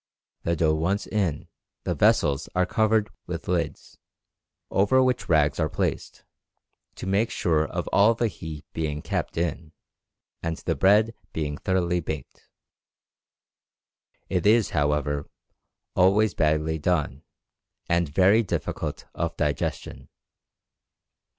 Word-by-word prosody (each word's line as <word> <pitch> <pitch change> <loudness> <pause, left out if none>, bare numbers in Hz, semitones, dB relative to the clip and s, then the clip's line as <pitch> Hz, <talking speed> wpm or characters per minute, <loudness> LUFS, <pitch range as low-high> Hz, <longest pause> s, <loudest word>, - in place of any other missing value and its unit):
The 85 - 0
dough 80 -1 +2
once 90 +6 0
in, 95 -9 -1 0.4
the - - -1
vessels 70 0 +2
are 90 0 +3
covered 110 +1 +1 0.2
with - - -5
lids, - - -3 0.7
over 115 +7 +4
which 130 -1 0
rags 75 -2 +3
are 80 -2 +1
placed, - - -3 0.7
to - - -7
make 100 +5 +1
sure 80 -6 +1
of - - -4
all 105 +3 +4
the 120 0 +1
heat 80 -6 -8
being 75 -2 -3
kept - - -3
in 80 -1 -2 0.7
and 80 -1 -3
the 85 - -2
bread 105 +9 +4 0.2
being 75 -2 -2
thoroughly 90 -2 +1
baked. 80 - -7 1.8
It 90 0 0
is, 110 0 +4
however, 75 -1 0 0.7
always 100 +4 +4
badly 80 0 +1
done, 75 -4 0 0.7
and 85 -2 +1
very 95 +8 +4
difficult 105 - -4
of 85 0 -3
digestion. 75 -3 -3
85 Hz, 120 wpm, -25 LUFS, 75-100 Hz, 1.8 s, over